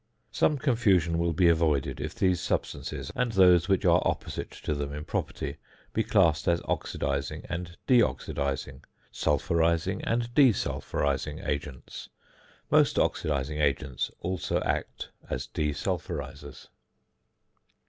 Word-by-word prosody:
Some 150 - +2
confusion 100 - +2
will 85 0 +1
be 85 +2 +3
avoided 80 -5 +2
if - - -5
these 90 -3 +1
substances 70 -1 -3
and 125 -2 0
those 90 -2 +5
which 95 -2 +2
are - - +5
opposite - - -3
to - - -4
them 70 -1 -3
in 75 +1 -6
property - - -3 0.4
be 110 - +1
classed 90 -10 +3
as 85 -1 +3
oxidising 70 +3 -3
and 85 0 -5
de 125 -2 +5
oxidising, 70 - -1 0.3
sulphurising, 85 +5 +1
and 120 0 -1
de 135 -4 +6
sulphurising 70 -6 -2
agents. 70 -3 -5 0.6
Most - - +4
oxidising 75 0 0
agents 70 -2 0
also 90 0 -1
act - - -3 0.2
as - - -3
de 75 -1 -2
sulphurisers. 70 0 -5
80 Hz, 125 wpm, -28 LUFS, 70-95 Hz, 0.6 s, de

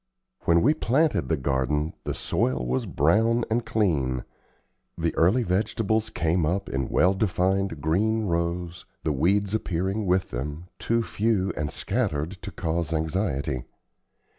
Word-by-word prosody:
When 85 0 +4
we 145 +6 +5
planted 155 +2 +1
the 80 - +2
garden, 70 +3 0
the - - -2
soil 65 -1 0
was 65 +2 -1
brown 115 - +2
and 120 +2 +1
clean. 70 - 0 0.7
The - - 0
early 95 +10 +3
vegetables 110 +3 0
came 85 +1 0
up 95 +6 0
in 65 -1 -2
well 90 +2 +4
defined 95 -3 0
green 110 +9 +1
rows, 85 -1 -2 0.2
the 75 - 0
weeds 100 +8 +1
appearing 95 0 -1
with 90 +1 +1
them, 75 +8 -5
too 115 0 +1
few 105 -3 0
and 75 0 -2
scattered 85 - -1
to - - -6
cause 85 0 -2
anxiety. 80 - -1
90 Hz, 140 wpm, -26 LUFS, 75-105 Hz, 0.7 s, we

